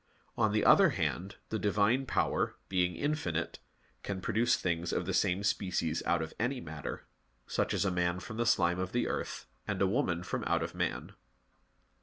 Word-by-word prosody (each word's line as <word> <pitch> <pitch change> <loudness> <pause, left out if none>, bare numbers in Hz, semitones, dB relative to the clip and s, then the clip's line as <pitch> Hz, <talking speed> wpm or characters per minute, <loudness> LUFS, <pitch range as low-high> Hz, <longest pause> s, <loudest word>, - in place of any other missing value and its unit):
On 110 -2 +2
the 105 0 +1
other - - +7
hand, 95 +3 -2
the 110 - -1
Divine 105 +6 +2
Power, 85 -8 +1
being 90 -2 +1
infinite, 115 - -2 0.4
can 100 -2 -4
produce 120 +6 +2
things 85 -1 -1
of 90 - -1
the 95 - -2
same 95 +1 +2
species 90 -5 0
out 85 -2 +2
of 80 - -7
any 125 +3 0
matter, 75 - -6 0.4
such - - -1
as - - +1
a 95 - +2
man 90 0 0
from 110 +3 -8
the 120 0 +1
slime 90 -5 +3
of 95 0 -3
the 120 - +1
earth, - - -3 0.2
and - - -1
a 100 - +4
woman 95 -5 0
from - - -3
out - - +1
of - - -5
man. - - -2
95 Hz, 185 wpm, -32 LUFS, 85-110 Hz, 0.4 s, other